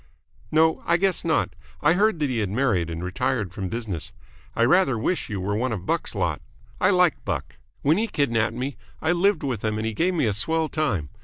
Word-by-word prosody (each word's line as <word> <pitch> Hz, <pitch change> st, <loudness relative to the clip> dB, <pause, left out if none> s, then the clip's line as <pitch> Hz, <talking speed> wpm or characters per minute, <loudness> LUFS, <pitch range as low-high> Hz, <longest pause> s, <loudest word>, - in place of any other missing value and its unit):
"No, 160 Hz, +1 st, +3 dB
I 170 Hz, -, +4 dB
guess 190 Hz, 0 st, +1 dB
not. -, -, +1 dB, 0.3 s
I 155 Hz, -, +4 dB
heard 210 Hz, +1 st, +3 dB
that 145 Hz, -2 st, +1 dB
he 120 Hz, -, 0 dB
had 105 Hz, -3 st, -1 dB
married 105 Hz, -7 st, +1 dB
and 85 Hz, +1 st, -5 dB
retired 100 Hz, 0 st, -1 dB
from 95 Hz, -1 st, -4 dB
business. 110 Hz, -8 st, -4 dB, 0.4 s
I 115 Hz, -, +3 dB
rather 145 Hz, -3 st, +4 dB
wish 165 Hz, +11 st, -1 dB
you 105 Hz, -2 st, -3 dB
were 100 Hz, +2 st, -1 dB
one 125 Hz, +3 st, 0 dB
of 95 Hz, -5 st, -4 dB
Buck's -, -, -1 dB
lot. -, -, -1 dB, 0.4 s
I 185 Hz, -, +4 dB
like 180 Hz, -5 st, +3 dB
Buck. -, -, -4 dB, 0.3 s
When 155 Hz, +7 st, +3 dB
he 225 Hz, -, 0 dB
kidnapped 115 Hz, -, 0 dB
me, 130 Hz, +3 st, -4 dB, 0.2 s
I 160 Hz, -, +1 dB
lived 185 Hz, +1 st, +2 dB
with 130 Hz, -5 st, -2 dB
him 110 Hz, -1 st, 0 dB
and 110 Hz, -, -2 dB
he 110 Hz, -, -1 dB
gave 180 Hz, -, +1 dB
me 160 Hz, -, +2 dB
a 105 Hz, -, +1 dB
swell 160 Hz, +10 st, +1 dB
time. 115 Hz, -, -1 dB
130 Hz, 220 wpm, -24 LUFS, 105-165 Hz, 0.4 s, I